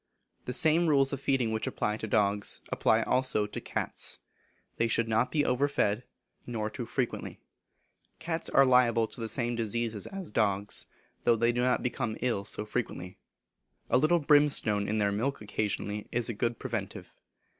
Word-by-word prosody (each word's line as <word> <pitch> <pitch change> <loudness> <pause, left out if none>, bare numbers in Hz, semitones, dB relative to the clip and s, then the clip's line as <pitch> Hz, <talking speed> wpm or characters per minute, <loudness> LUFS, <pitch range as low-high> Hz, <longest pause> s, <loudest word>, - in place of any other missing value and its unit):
The - - -3
same 165 +1 +4
rules 140 -2 +3
of 140 - -4
feeding 130 -5 +1
which 110 0 -2
apply 105 0 -1
to 110 - -5
dogs 100 -1 +1
apply - - +2
also 130 -5 +1
to 105 - -7
cats. - - -3 0.6
They 115 - +2
should 115 0 0
not 115 +2 +1
be 150 -2 +1
over 130 +3 +2
fed, 105 -4 0 0.4
nor 110 -3 -3
too 120 -4 -6
frequently. 125 -3 -3 0.8
Cats 165 0 -3
are 135 - +5
liable 120 -3 +4
to 115 - -11
the 115 - -3
same 120 0 0
diseases 115 -1 -3
as 195 -3 -7
dogs; 100 -1 +1 0.4
though 120 - +4
they 115 +1 +2
do 120 +1 -1
not 125 0 +1
become 120 -3 -2
ill 115 -5 -1
so 105 - 0
frequently. 105 -5 -4 0.7
A - - +5
little 155 +5 +4
brimstone 145 -9 +3
in 110 - 0
their 100 -1 +2
milk 125 +7 -1
occasionally 105 0 -3
is 120 -1 0
a - - -1
good 115 +2 -1
preventive. - - -5
115 Hz, 170 wpm, -29 LUFS, 105-135 Hz, 0.8 s, are